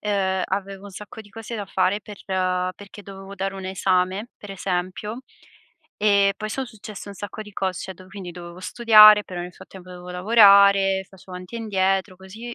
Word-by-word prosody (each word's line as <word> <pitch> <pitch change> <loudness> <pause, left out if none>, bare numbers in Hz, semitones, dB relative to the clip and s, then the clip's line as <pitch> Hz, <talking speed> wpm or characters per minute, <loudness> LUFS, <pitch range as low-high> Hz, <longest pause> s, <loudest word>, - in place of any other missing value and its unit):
ehm, 190 -2 0
avevo 195 0 -4
un 200 - -10
sacco 210 +3 -10
di 205 - -19
cose 225 +2 -8
da 205 - -4
fare 190 +2 0
per 205 -2 -11 0.6
perché 205 +1 -13
dovevo 195 0 -10
dare 195 0 -3
un 190 -1 -8
esame, 190 +3 0
per 205 - -11
esempio, 195 +5 -4 0.7
e 200 -1 +3
poi 215 0 -5
son 265 +3 -3
successe 215 -3 -10
un 200 - -8
sacco 205 +2 -8
di 210 -1 -14
cos 190 -2 -2
cioè 190 - -7
do 185 +1 -16
quindi, 190 -3 -9
dovevo 175 0 -10
studiare, 215 -1 +7
però 180 -2 -7
nel 175 0 -8
frattempo 185 -1 -14
dovevo 180 0 -10
lavorare, 195 -1 +5
facevo 190 -1 -15
avanti 180 +4 -10
e - - -4
indietro, 195 -3 -1
così, 215 +6 -10
195 Hz, 185 wpm, -23 LUFS, 185-210 Hz, 0.7 s, studiare